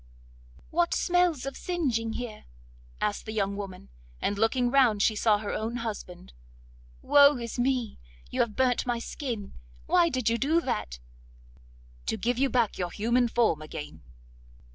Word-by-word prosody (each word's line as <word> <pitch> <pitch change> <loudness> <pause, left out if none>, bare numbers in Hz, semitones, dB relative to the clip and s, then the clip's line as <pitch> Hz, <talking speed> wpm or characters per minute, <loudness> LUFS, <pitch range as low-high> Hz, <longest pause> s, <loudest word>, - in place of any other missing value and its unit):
'What 340 +1 +2
smells 355 -6 +2
of 275 - -5
singeing 255 -11 -1
here?' 235 -4 -6 0.5
asked 210 +1 -2
the - - -3
young 200 -2 -1
woman, 195 - -7 0.3
and 205 - -1
looking 240 +4 +1
round 245 -7 +4
she 220 - +3
saw 210 0 +3
her 205 -1 -4
own 225 +2 -3
husband. 205 - -6 0.7
'Woe 285 -1 +6
is 235 0 -5
me! 250 -3 0 0.3
you - - -3
have 215 -3 -1
burnt 255 -1 +1
my 240 -1 +1
skin. 230 -4 -5 0.3
Why 350 -2 +4
did 255 -6 -2
you 230 0 +2
do 310 +5 +3
that?' 150 - -3 1.1
'To 220 - 0
give 240 +4 -1
you 275 0 +3
back 240 -4 +1
your 180 -1 -1
human 235 +6 +1
form 225 -10 +1
again. 150 - -8
235 Hz, 155 wpm, -28 LUFS, 210-260 Hz, 1.1 s, Woe